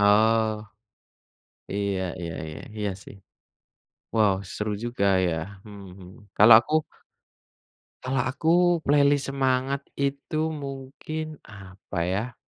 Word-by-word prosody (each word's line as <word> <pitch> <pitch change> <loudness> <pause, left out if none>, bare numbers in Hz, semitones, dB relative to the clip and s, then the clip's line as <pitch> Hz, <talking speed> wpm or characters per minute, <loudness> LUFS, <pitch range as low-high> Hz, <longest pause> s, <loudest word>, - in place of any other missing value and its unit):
Oh. 110 +2 +4 1.2
Iya 100 -1 -1 0.2
iya 85 -1 -4
iya 75 - -8 0.2
iya 105 -1 -1
sih. - - -13 1.0
Wow 105 -3 +4 0.2
seru 105 0 -2
juga 120 -4 -2 0.2
ya. 85 - 0 0.3
Mhm 100 -1 -10
mhm, 90 0 -13 0.3
kalau 110 +3 +9
aku 135 - -9 1.3
kalau 130 0 -1
aku, 160 +4 -1 0.3
playlist 145 -1 +3
semangat 135 0 0
itu 140 +3 -1
mungkin, 145 +2 -6
apa 95 -2 -9
ya? 100 +7 -2
115 Hz, 105 wpm, -25 LUFS, 100-140 Hz, 1.3 s, kalau